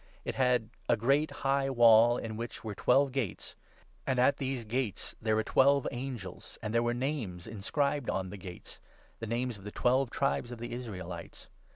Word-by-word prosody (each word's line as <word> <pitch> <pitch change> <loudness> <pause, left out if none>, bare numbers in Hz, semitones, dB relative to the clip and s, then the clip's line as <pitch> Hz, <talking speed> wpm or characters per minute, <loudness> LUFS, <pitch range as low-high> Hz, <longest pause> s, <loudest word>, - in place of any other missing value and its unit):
It - - -2
had 125 -4 +1 0.2
a 120 - +4
great 140 +7 +2
high 140 -1 0
12 135 -2 -4
wall, 115 0 +7
in 110 -1 -5
which 115 +1 -6
were 110 -2 -4
twelve 135 +6 +3
gates; 125 -8 -3 0.5
and 130 - +1
at 130 +3 +4
these 130 -3 -2
gates 110 -3 -3
there 110 -1 +2
were 110 - +2
twelve 140 +3 +4
angels, 120 -8 -6
and 110 0 -3
there 115 - +3
were 120 0 0
names 120 - -3
inscribed 140 +6 -1
on 95 -1 -2
the 100 - -7
gates, 90 -2 -10 0.4
the 115 - -5
names 120 -1 -2
of - - -14
the 105 - -6
twelve 125 +4 +2
tribes 130 -2 -1
of 120 - -6
the 120 +1 -6
Israelites. 95 -8 -7
120 Hz, 190 wpm, -31 LUFS, 110-135 Hz, 0.5 s, wall